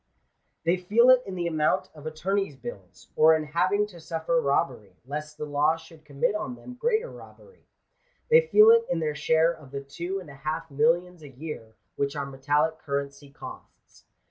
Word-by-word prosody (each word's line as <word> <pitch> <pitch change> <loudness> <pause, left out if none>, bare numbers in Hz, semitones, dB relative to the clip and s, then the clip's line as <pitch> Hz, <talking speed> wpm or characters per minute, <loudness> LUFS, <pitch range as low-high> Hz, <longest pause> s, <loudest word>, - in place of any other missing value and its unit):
They 170 +2 +2
feel 220 +8 +5
it 255 -1 +6
in 190 - -5
the 175 -1 -2
amount 170 +3 0
of 155 0 -10
attorneys' 185 +1 -2
bills; 100 -7 -10
or 160 +1 +6
in 155 - -1
having 180 +7 +1
to 190 -5 -13
suffer 165 0 -1
robbery, 125 -9 -1
lest 150 +2 -6
the - - -4
law 150 +2 +2
should 160 -1 -16
commit 140 +5 0
on 215 +4 -4
them 250 - -11
greater 465 - 0
robbery. 475 - -16 0.6
They 475 +1 +8
feel 430 0 +7
it 460 0 +4
in - - 0
their 155 -2 -1
share 160 +3 +2
of 150 -5 -15
the 140 0 -6
two 170 +7 -5
and 170 -6 -11
a - - -11
half 155 +3 -5
millions 165 +4 +1
a 145 - -11
year, 130 -5 -8 0.2
which 140 0 -1
our 140 -1 -2
metallic 145 +4 0
currency 140 0 -4
costs. 140 - -13
160 Hz, 185 wpm, -26 LUFS, 145-180 Hz, 0.6 s, They